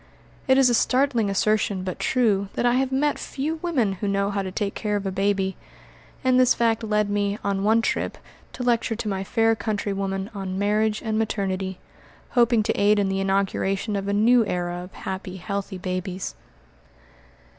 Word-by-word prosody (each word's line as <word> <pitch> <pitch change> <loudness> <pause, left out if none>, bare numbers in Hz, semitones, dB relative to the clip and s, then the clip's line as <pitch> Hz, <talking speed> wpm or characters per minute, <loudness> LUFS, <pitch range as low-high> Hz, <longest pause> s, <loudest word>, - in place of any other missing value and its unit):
It 265 0 +5
is 270 -1 +6
a 245 - +3
startling 250 -2 +2
assertion, 200 -1 +1
but 185 -1 -5
true, 205 -6 +1
that - - -1
I 240 - +4
have 260 +1 +1
met 285 +2 +1
few 305 +4 -3
women 260 - +1
who 205 - -1
know 200 0 0
how 200 0 -1
to 190 -1 -4
take 200 +1 -2
care 210 -1 -2
of 205 -1 -2
a 195 - -1
baby. 195 0 0 0.7
And 255 -1 +4
this 255 0 +5
fact 230 -1 +1
led 210 -1 +1
me, 205 0 0
on 195 -1 -1
one 225 +2 +3
trip, - - -1 0.4
to 250 - -5
lecture 235 -2 +1
to 220 - -5
my 195 -2 -2
fair 225 +3 +2
countrywomen 200 -1 -2
on 190 -2 -4
"Marriage 210 +2 +1
and 220 -1 0
Maternity," 190 -3 -2 0.5
hoping 235 -3 +3
to 220 - 0
aid 205 +1 +3
in 200 -1 +1
the 195 0 -1
inauguration 195 +1 0
of 200 0 -2
a - - 0
new 230 +4 +5
era 175 -1 -2
of 180 - -11
happy, 190 0 -6
healthy 195 +1 -4
babies. 185 0 -4
205 Hz, 185 wpm, -24 LUFS, 195-230 Hz, 0.7 s, is